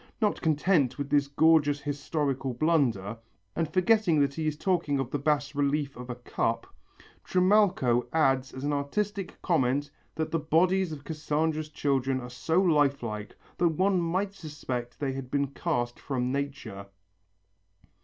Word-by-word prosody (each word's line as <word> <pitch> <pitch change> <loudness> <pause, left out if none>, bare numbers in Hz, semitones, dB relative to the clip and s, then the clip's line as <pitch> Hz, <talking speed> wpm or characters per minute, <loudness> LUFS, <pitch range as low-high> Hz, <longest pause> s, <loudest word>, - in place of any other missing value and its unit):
Not 210 -3 +1
content 150 -4 +2
with 140 -1 -4
this 145 -1 +3
gorgeous 145 0 +4
historical 140 -2 -2
blunder, 120 - +1 0.4
and 165 -2 -1
forgetting 185 -2 +3
that 140 -1 +1
he 155 +1 -2
is 150 -1 -1
talking 170 -5 0
of 135 -1 -3
the 145 - -1
bas 145 0 0
relief 140 0 0
of 125 0 -9
a 125 - -3
cup, 115 -1 -2 0.6
Trimalcho 180 - +3
adds 135 -5 +2
as 130 - -8
an 145 +1 0
artistic 195 +7 -2
comment 145 -4 +1 0.2
that 160 0 -2
the 165 - +1
bodies 175 +4 +2
of 145 -2 -7
Cassandra's 155 0 -1
children 135 -3 0
are 125 -1 -8
so 160 +8 0
life 145 -7 +3
like 105 -2 -5 0.2
that 175 - +4
one 185 +3 +2
might 185 +4 -1
suspect 130 -8 -6
they 135 -2 -1
had 135 -1 -6
been 140 0 0
cast 120 -5 -2
from 125 -2 -2
nature. 135 -8 -4
145 Hz, 155 wpm, -28 LUFS, 130-165 Hz, 0.6 s, gorgeous